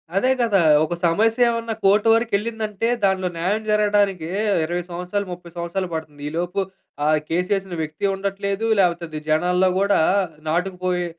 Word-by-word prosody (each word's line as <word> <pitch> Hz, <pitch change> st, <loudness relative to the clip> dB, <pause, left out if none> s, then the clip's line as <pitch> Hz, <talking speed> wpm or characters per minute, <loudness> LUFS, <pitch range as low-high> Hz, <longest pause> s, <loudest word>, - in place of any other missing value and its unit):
అదే 225 Hz, +7 st, +2 dB
గదా! 210 Hz, -6 st, +3 dB, 0.2 s
ఒక 160 Hz, -, -2 dB
సమస్య 220 Hz, +8 st, +3 dB
ఏమన్నా 230 Hz, -1 st, -2 dB
కోర్ట్ 205 Hz, +3 st, +4 dB
వరకెళ్ళిందంటే, 225 Hz, -1 st, -1 dB, 0.2 s
దాంట్లో 190 Hz, -1 st, +2 dB
న్యాయం 195 Hz, +6 st, 0 dB
జరగడానికే 205 Hz, -5 st, +1 dB, 0.3 s
20 175 Hz, +2 st, -2 dB
సంవత్సరాలు, 180 Hz, +4 st, -3 dB
30 175 Hz, -1 st, -11 dB
సంవత్సరాలు 175 Hz, +2 st, -3 dB
బడుతుంది. 155 Hz, -3 st, -6 dB
ఈ -, -, -10 dB
లోపు 180 Hz, +3 st, -2 dB, 0.4 s
ఆ -, -, +1 dB, 0.2 s
కేస్ 180 Hz, +2 st, 0 dB
వేసిన 195 Hz, -2 st, -3 dB
వ్యక్తి 155 Hz, +6 st, -4 dB
ఉండట్లేదు. 200 Hz, +2 st, -2 dB
లేపోతే 175 Hz, -2 st, +2 dB
అది 155 Hz, -1 st, -5 dB
జనాల్లో 180 Hz, +4 st, +3 dB
గూడా 200 Hz, -2 st, +3 dB, 0.5 s
నాటుకుపోయి 180 Hz, +1 st, -1 dB
190 Hz, 145 wpm, -22 LUFS, 175-205 Hz, 0.5 s, కోర్ట్